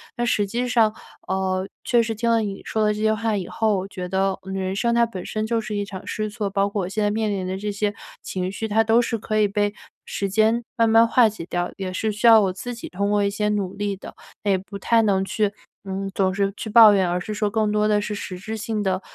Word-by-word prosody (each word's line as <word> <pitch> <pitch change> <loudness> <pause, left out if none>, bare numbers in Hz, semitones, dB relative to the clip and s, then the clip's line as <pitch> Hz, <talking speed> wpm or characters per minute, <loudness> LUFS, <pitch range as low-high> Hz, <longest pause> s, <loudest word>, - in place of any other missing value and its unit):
但 240 - -1
实 210 -3 +1
际 240 +4 -2
上， 225 -3 +3 0.3
呃， 190 0 -1 0.2
确 240 -1 +3
实 225 0 -2
听 230 +2 -1
了 230 - +4
你 200 -3 -4
说 220 -1 -1
的 210 - +2
这 210 - -6
些 220 0 +3
话 220 0 -1
以 185 -3 -3
后， 220 -2 +1
我 190 - -5
觉 180 -2 -6
得 190 +1 0
人 190 0 -3
生 235 +3 +1
它 235 - +4
本 190 -6 -7
身 215 0 -2
就 230 0 0
是 215 -1 -4
一 205 - -1
场 190 -2 -8
试 215 0 -2
错， 210 -2 -3
包 200 0 +1
括 200 -2 -2
我 175 - -4
现 210 +2 -1
在 205 - +2
面 220 0 0
临 190 -2 -2
的 190 +1 -3
这 205 +1 -3
些 205 0 -1 0.3
情 185 0 -3
绪， 220 +3 -4
它 220 +2 +3
都 225 +2 +4
是 230 -1 -1
可 215 0 -2
以 210 - +4
被 205 0 0 0.3
时 200 - -3
间 220 +4 +2
慢 230 -1 +4
慢 225 +1 +6
化 245 -1 +5
解 215 -5 -6
掉， 175 0 -2
也 190 -1 -4
是 215 +4 -1
需 210 +3 -3
要 225 -1 +9
我 190 -2 0
自 245 +6 -6
己 230 - -8
通 200 +2 -1
过 205 -1 +2
一 200 - +2
些 210 +1 -1
努 200 -3 -1
力 205 0 -2
的， - - -11 0.3
那 205 - +2
也 190 - +3
不 200 +2 -8
太 230 +3 +3
能 195 -3 +2
去 210 +1 0 0.3
嗯， 195 0 -3
总 190 -1 +1
是 200 0 0
去 220 - -6
抱 220 -1 +8
怨， 190 -3 +2
而 180 +1 0
是 215 +4 -5
说 210 0 0
更 215 0 0
多 210 0 +2
的 210 -1 +3
是 210 - -4
实 185 -3 -6
质 215 +4 -6
性 220 -1 -3
的， 190 -1 0
210 Hz, 290 characters per minute, -23 LUFS, 195-220 Hz, 0.3 s, 要